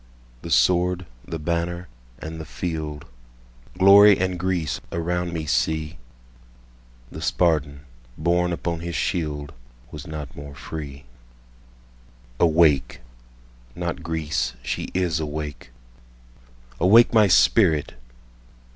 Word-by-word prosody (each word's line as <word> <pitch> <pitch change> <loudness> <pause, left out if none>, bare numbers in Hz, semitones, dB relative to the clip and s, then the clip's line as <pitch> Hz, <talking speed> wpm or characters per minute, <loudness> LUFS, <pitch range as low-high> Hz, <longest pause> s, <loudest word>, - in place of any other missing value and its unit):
The - - -8
sword, 90 0 +2 0.2
the 80 - -4
banner, 85 +2 -3 0.3
and 80 +1 -7
the - - -8
field, 80 -4 -5 0.7
Glory 100 +2 +8
and 95 -1 -1
Greece, 90 -4 -2
around 90 +1 -2
me 80 -2 -4
see! 75 +5 -1 1.1
The 80 - -8
Spartan, 80 -5 0 0.4
borne 90 +2 +1
upon 85 -1 -3
his 85 0 -5
shield, 75 -4 -2 0.4
Was 75 0 -9
not 75 -4 -7
more 70 0 -9
free. 70 -3 -8 1.4
Awake! 80 -7 +3 0.7
(not 85 -1 -4
Greece—she 75 -7 -3
is 90 -4 0
awake!)Awake, - - -1
my 110 -2 +6
spirit! 70 +1 +3
80 Hz, 95 wpm, -23 LUFS, 70-85 Hz, 1.4 s, Glory